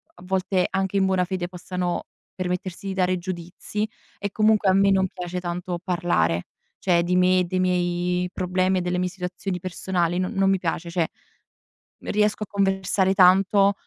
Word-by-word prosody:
a 175 - -15
volte 185 0 +1
anche 190 0 -1
in 195 - +3
buona 190 -1 +2
fede 180 -1 -3
possano 180 0 -3 0.3
permettersi 185 +1 -4
di 195 - -2
dare 185 -1 +1
giudizi. 180 +4 -4 0.3
E 200 0 -4
comunque 215 -1 +3
a - - +5
me 195 +1 +4
non 190 -1 +3
piace 180 0 -4
tanto 175 0 -4
parlare, 170 - 0 0.3
cioè 175 -2 +2
di 180 +1 0
me, 180 0 +4
dei 185 +1 -1
miei 180 0 0
problemi 185 +1 +1
e - - -2
delle 180 0 -1
mie 180 0 0
situazioni 180 0 -4
personali 175 -1 -1
no 185 0 0
non 195 -3 +2
mi 195 - +3
piace, 170 -1 -3
cioè 170 -1 0 0.9
riesco 210 0 0
a - - -7
conversare 195 -1 +1
tanto, 195 +2 +5
185 Hz, 170 wpm, -24 LUFS, 180-190 Hz, 0.9 s, a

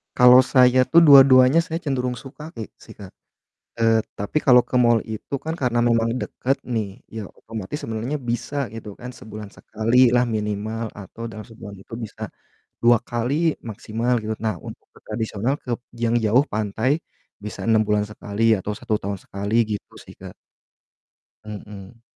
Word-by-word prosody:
Kalau 125 +1 +8
saya 130 -1 +4
tuh 170 - +6
dua-duanya 135 0 +7
saya 165 +1 -4
cenderung 125 -4 -1
suka 150 +5 -11
ki 110 -2 -7
sih, - - -14
Kak, 100 -3 -11 0.7
eee, 115 -1 +4 0.2
tapi 100 +9 -1
kalau 125 -3 +6
ke 125 - -3
mall 120 -2 +4
itu 110 +5 -7
kan 160 - -2
karena 120 -2 0
memang 115 -1 +2
dekat, 135 +3 -1
nih, 110 -5 -4
ya, 110 - -5 0.2
otomatis 110 +4 -6
sebenarnya 115 +6 -3
bisa 120 +5 -3 0.2
gitu 105 -2 -8
kan 125 +1 -7
sebulan 105 -3 -10
sekalilah 120 +2 +2
minimal 110 +1 -3
atau 115 +3 -8
dalam 110 -1 -9
sebulan 105 -3 -11
itu 115 - -11
bisa, 105 - -11 0.6
2 120 -1 +6
kali 130 +7 -1
maksimal, 115 +2 -2
gitu. 110 0 -4
Nah, 110 -1 -1
untuk - - -10
ke - - -19
tradisional 110 +3 -2
kep 120 -2 -3 0.2
yang 115 0 0
jauh 115 +5 +3
pantai, 110 +5 -1 0.4
bisa 105 - -6
6 110 -1 +4
bulan 105 0 +2
sekali 105 +1 -5 0.2
atau 105 - -4
1 110 -1 -2
tahun 100 0 -4
sekali 100 +2 -4 0.2
gitu 100 - -11
sih, - - -14
Kak. - - -10 1.1
Mhm. 105 +1 -10
115 Hz, 160 wpm, -22 LUFS, 105-125 Hz, 1.1 s, Kalau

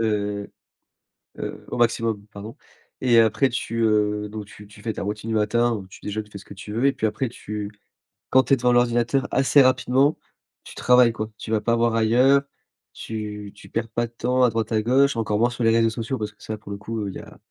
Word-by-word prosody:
heu, 105 -2 -1 0.9
heu - - -6
au - - -4
maximum 115 -3 0
pardon. 105 +1 -10 0.4
Et 120 -3 +4
après 115 +5 +3
tu, 115 -1 -3
heu, 105 -1 +1
donc 105 0 -7
tu 105 0 -14
tu 105 +1 -16
fais 110 - -2
ta - - -5
routine 105 +2 -4
du 110 - 0
matin 115 +3 +2
où 95 -4 -6
tu - - -15
déjeunes, 105 +1 -4
tu 105 - -22
fais 100 - -8
ce - - -13
que - - -11
tu 105 +2 -9
veux 120 +4 0
et 140 - +5
puis 110 -4 0
après 120 +4 -2
tu 105 -3 -6 0.6
quand 130 0 +5
tu 135 - +1
es 135 - +5
devant 125 +1 +2
l'ordinateur 120 +2 +2
assez 135 +1 +5
rapidement, 130 +2 +3 0.5
tu - - -11
travailles 125 -1 +5
quoi. 110 -2 -5
Tu 110 - -7
vas 110 - +2
pas 115 +2 +1
voir 115 0 +2
ailleurs, 125 +5 +4 0.5
tu 105 -2 -6
tu - - -15
perds 115 0 -3
pas 120 +1 -1
de - - -23
temps 125 +2 +1
à 125 - +5
droite 115 0 -2
à 110 - +2
gauche, 135 +4 +3
encore 105 -2 0
moins 120 +2 +3
sur 120 0 -4
les 115 - +5
réseaux 115 0 +3
sociaux 115 +4 -3
parce 105 -2 -4
que 105 -1 -29
ça 110 +1 -5
pour 105 -1 -11
le 100 - -4
coup 110 0 -4
il - - -8
y - - -6
a - - -13
115 Hz, 240 wpm, -23 LUFS, 105-120 Hz, 0.9 s, et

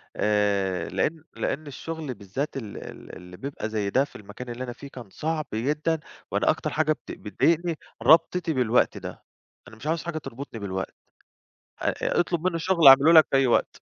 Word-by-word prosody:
آآ، 100 -3 +1
لإن 150 - -1
لإن 150 +2 -3
الشُغل 155 0 -5
بالذات 130 +9 -4
ال 110 -6 -7
ال - - -10
اللي 90 0 -12
بيبقى 135 -5 -5
زي 105 -2 -1
ده 130 +6 +3
في 145 - -22
المكان 105 +5 -9
اللي 120 +2 -5
أنا 120 -1 -5
فيه 140 - -11
كان 120 -7 -10
صعب 155 +5 -2
جدًا، 150 +8 0 0.3
وأنا - - +1
أكتر - - 0
حاجة 155 0 +1
بت 150 - -4
بتضايقني 165 +9 0 0.3
ربطِتي 165 +1 +4
بالوقت 125 -3 +2
ده، - - -8 0.4
أنا 110 - -13
مش 130 +7 -9
عاوز 165 0 0
حاجة 170 -2 -4
تربُطني 135 -4 -7
بالوقت. 95 -1 -4 0.9
أ - - +2
أ - - -1
اطلُب 175 0 0
منّي 170 -2 -1
شُغل 170 -4 +4
أعمله 135 +4 +9
لك 160 -1 +8
في - - +2
أي 135 - +3
وقت. 120 - +1
135 Hz, 185 wpm, -26 LUFS, 110-160 Hz, 0.9 s, أعمله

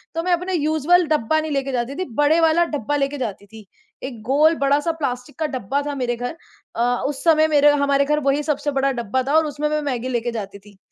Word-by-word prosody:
तो 330 - -1
मैं 360 -1 +1
अपने 360 +2 -1
यूज़ुअल 315 +2 +2
डब्बा 310 0 +1
नहीं 310 - -5
लेके 275 -1 -1
जाती 250 +2 -2
थी, 370 - -3
बड़े 295 +3 +3
वाला 325 +1 +4
डब्बा 290 +1 -2
लेके 280 0 -1
जाती 205 -5 -5
थी। 215 -2 -14 0.4
एक 245 -5 -7
गोल 300 +7 +3
बड़ा-सा 285 +4 +2
प्लास्टिक 285 -2 -5
का 315 - 0
डब्बा 265 0 -2
था 285 - -3
मेरे 245 -3 -1
घर 245 +7 -5 0.4
अ, - - -2 0.3
उस 280 -1 -5
समय 315 -2 +4
मेरे 295 -1 +5
हमारे 280 -1 +2
घर 300 +1 +1
वही 285 +2 +1
सबसे 295 -1 -1
बड़ा 275 0 +1
डब्बा 240 0 -2
था 290 - +1
और 320 - +3
उसमें 300 0 -2
मैं 305 0 -1
मैगी 255 -4 -3
लेके 240 -1 -2
जाती 200 -3 -6
थी। 200 0 -19
285 Hz, 230 wpm, -21 LUFS, 250-310 Hz, 0.4 s, मेरे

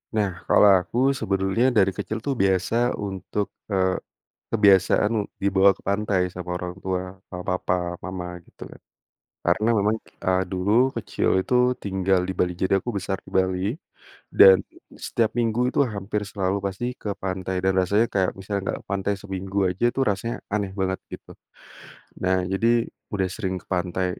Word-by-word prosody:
Nah, 105 -3 +2 0.2
kalau 105 - +6 0.2
aku 105 +7 -6 0.2
sebetulnya 95 +4 +1
dari 95 -1 +4
kecil 110 - -3
tuh 140 -2 0
biasa 95 +3 +1 0.2
untuk, 100 0 -3 0.2
eee, 95 -1 +2 0.6
kebiasaan 100 +1 +4 0.3
dibawa 100 0 +5
ke - - -22
pantai 100 -1 +1
sama 90 -1 -7
orang 90 0 -5
tua 95 -1 -1 0.2
sama 90 -1 -7
papa 90 - -1 0.3
mama 90 -1 -5 0.2
gitu, - - -19 0.8
karena 105 +6 +2
memang, 105 +2 +2 0.3
eee, 95 0 +2
dulu 95 +2 -1 0.3
kecil 105 - -1 0.2
itu - - -2 0.3
tinggal 95 -1 +1
di 95 - -2
Bali 90 -1 0
jadi 95 +1 0
aku - - -5
besar 95 0 -2
di - - -12
Bali, 95 -1 +1 0.7
dan 95 0 +7 0.4
setiap 115 0 0
minggu 115 -1 0
itu 130 - -1
hampir 105 -3 -3
selalu 95 -1 0
pasti 100 +5 -3 0.2
ke 105 - -4
pantai 95 0 -3
dan 95 0 +3
rasanya 100 +5 +2
kayak 95 -2 +2
misalnya 100 +1 -3
enggak - - -4
ke - - -34
pantai 100 +1 0
seminggu 95 0 -5
aja 90 +4 -3
itu - - -5
rasanya 105 +4 -2 0.2
aneh 100 -2 -1
banget 95 0 0
gitu. - - -10 0.9
Nah, 95 0 +2
jadi 95 +4 0 0.5
udah 95 -2 0
sering 95 0 -3
ke - - -34
pantai 90 0 -1
95 Hz, 160 wpm, -24 LUFS, 95-105 Hz, 0.9 s, dan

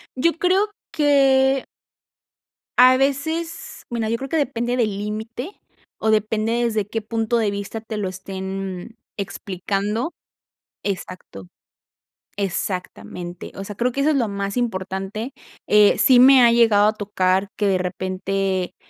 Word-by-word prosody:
Yo 335 +6 +2
creo 375 +4 +2 0.2
que 270 -2 +3 1.1
a 255 +1 +8
veces 320 +5 -2
bueno, 230 -2 -2
yo 230 - 0
creo 270 +1 -6
que, 325 - 0
depende 240 -4 -1
del 215 -4 0
límite, 220 - -6 0.4
o 220 - +1
depende 220 +2 +1
desde 220 -4 0
qué 225 +1 -3
punto 225 +1 -1
de 215 -3 +1
vista 200 +2 -5
te 220 -1 -6
lo 200 -2 -2
estén 190 +2 -6 0.2
explicando. 200 - -3 0.7
Exacto. 185 - -6 0.9
Exactamente, 180 -2 -4
o 195 - -6
sea, 205 +1 -8
creo 245 +4 0
que 275 +3 -2
eso 305 +2 +3
es - - +1
lo 240 -5 +1
más 200 +1 -3
importante, 195 +1 -3 0.3
eh, 210 -1 +5
sí 255 -2 +6
me 260 0 +8
ha 235 - +6
llegado 220 -3 +5
a 215 - +2
tocar 195 -2 0
que 210 - 0
de 190 -2 +2
repente, 185 0 -2
215 Hz, 140 wpm, -22 LUFS, 195-250 Hz, 1.1 s, a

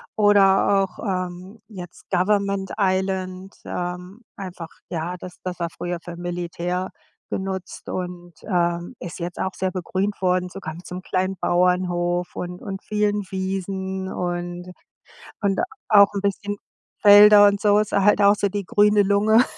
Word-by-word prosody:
oder 200 -1 +4
auch, 185 - -16
ähm, 185 +1 -4
jetzt 180 -5 -11
Government 200 +1 +1
Island, 190 0 -1
ähm, 180 +4 -5 0.2
einfach 180 -4 -7 0.2
ja, 170 +1 -3
das 180 0 -9
das 180 -1 -5
war 170 - -1
früher 175 +1 -4
für 175 - -8
Militär 175 +1 -3 0.4
genutzt 190 -1 -5
und, 180 -1 -5
ähm, 175 +1 -1
ist 175 +1 -7
jetzt 175 0 -5
auch 190 - -2
sehr 190 0 -2
begrünt 190 +3 -3
worden, 180 0 +1
sogar 180 -4 -7
mit 175 +1 -12
so 180 - -7
'nem 180 - -6
kleinen 185 +1 -1
Bauernhof 175 0 +1
und 180 0 -5
und 195 -1 -6
vielen 210 -1 0
Wiesen 190 0 -3
und 175 0 -4 0.7
und 200 -2 +1 0.3
auch 205 -2 +6
'n 200 - -2
bisschen 205 +1 -2 0.4
Felder 205 0 +9
und 200 0 +1
so. 205 -1 +4
Ist 215 - -2
a 200 - +3
halt 210 +1 +4
auch 200 0 +6
so 200 -1 0
die 200 0 -4
grüne 210 +2 +4
Lunge 210 +4 +4
190 Hz, 155 wpm, -23 LUFS, 180-200 Hz, 0.7 s, Felder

